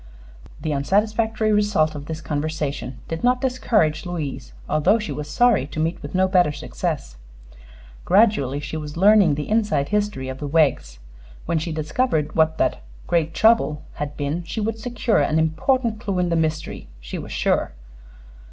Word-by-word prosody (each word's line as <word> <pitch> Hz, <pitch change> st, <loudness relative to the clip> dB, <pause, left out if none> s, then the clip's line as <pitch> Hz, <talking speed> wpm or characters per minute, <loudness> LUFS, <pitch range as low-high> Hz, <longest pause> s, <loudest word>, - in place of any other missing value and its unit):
The 155 Hz, 0 st, -2 dB
unsatisfactory 215 Hz, +8 st, +1 dB
result 205 Hz, -7 st, +2 dB
of 145 Hz, -1 st, -8 dB
this 160 Hz, -1 st, -5 dB
conversation 150 Hz, -4 st, -3 dB
did 165 Hz, 0 st, -5 dB
not 250 Hz, +1 st, +3 dB
discourage 220 Hz, -, +1 dB
Louise, 160 Hz, -, -5 dB, 0.2 s
although 175 Hz, +9 st, +3 dB
she 210 Hz, -8 st, -5 dB
was 150 Hz, +1 st, -5 dB
sorry 230 Hz, -, +3 dB
to 155 Hz, -, -6 dB
meet 160 Hz, +2 st, -1 dB
with -, -, -7 dB
no 190 Hz, +1 st, +3 dB
better 180 Hz, -5 st, +3 dB
success. -, -, -4 dB, 0.9 s
Gradually 185 Hz, -, +3 dB
she 145 Hz, +2 st, -5 dB
was 150 Hz, 0 st, -7 dB
learning 195 Hz, -4 st, +5 dB
the 150 Hz, -, -4 dB
inside 205 Hz, -11 st, +1 dB
history 210 Hz, -10 st, -1 dB
of 130 Hz, 0 st, -6 dB
the 145 Hz, -, -4 dB
Weggs. 140 Hz, -, +1 dB, 0.5 s
When 165 Hz, -, 0 dB
she 165 Hz, +2 st, -4 dB
discovered 155 Hz, -, -1 dB
what 160 Hz, 0 st, +3 dB
that -, -, 0 dB, 0.2 s
"great 165 Hz, -1 st, 0 dB
trouble" 220 Hz, -10 st, +3 dB, 0.2 s
had 145 Hz, 0 st, -4 dB
been 145 Hz, +4 st, -2 dB
she 170 Hz, -, -5 dB
would 220 Hz, +1 st, -2 dB
secure 235 Hz, 0 st, 0 dB
an 155 Hz, -, +1 dB
important 220 Hz, -, +1 dB
clue 200 Hz, -5 st, -3 dB
in 180 Hz, -1 st, +1 dB
the 170 Hz, -, +1 dB
mystery, 160 Hz, -1 st, -2 dB
she -, -, -6 dB
was -, -, -8 dB
sure. 65 Hz, -, 0 dB
160 Hz, 165 wpm, -22 LUFS, 150-210 Hz, 0.9 s, learning